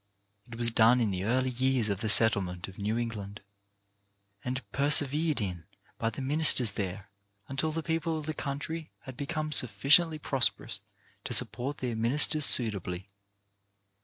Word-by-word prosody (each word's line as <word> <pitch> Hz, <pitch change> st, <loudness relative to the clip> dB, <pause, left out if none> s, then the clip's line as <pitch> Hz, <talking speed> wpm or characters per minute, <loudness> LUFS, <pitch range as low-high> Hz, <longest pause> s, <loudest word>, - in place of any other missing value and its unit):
It 120 Hz, -, -10 dB
was 115 Hz, 0 st, +1 dB
done 115 Hz, +2 st, +3 dB
in 110 Hz, -4 st, 0 dB
the 95 Hz, 0 st, -4 dB
early 130 Hz, +3 st, 0 dB
years 130 Hz, -2 st, 0 dB
of 100 Hz, -2 st, -3 dB
the 110 Hz, -, -2 dB
settlement 100 Hz, -5 st, +3 dB
of 95 Hz, 0 st, -13 dB
New 105 Hz, +3 st, -2 dB
England, 105 Hz, -3 st, -6 dB, 1.0 s
and 125 Hz, -3 st, -5 dB
persevered 145 Hz, +2 st, +2 dB
in 90 Hz, -6 st, -5 dB, 0.3 s
by 115 Hz, -, -1 dB
the 115 Hz, +4 st, -8 dB
ministers 135 Hz, -5 st, +5 dB
there 100 Hz, 0 st, -6 dB, 0.4 s
until 135 Hz, +4 st, -3 dB
the 160 Hz, +1 st, -5 dB
people 165 Hz, 0 st, -2 dB
of 155 Hz, -, -7 dB
the 155 Hz, -, -4 dB
country 155 Hz, +3 st, -6 dB
had 130 Hz, -, -11 dB
become 155 Hz, +3 st, -5 dB
sufficiently 155 Hz, +5 st, +2 dB
prosperous 135 Hz, -3 st, -2 dB, 0.5 s
to -, -, 0 dB
support 135 Hz, +4 st, -1 dB
their 125 Hz, -3 st, -4 dB
ministers 140 Hz, +6 st, +3 dB
suitably. 100 Hz, -5 st, +1 dB
125 Hz, 150 wpm, -28 LUFS, 105-145 Hz, 1.0 s, ministers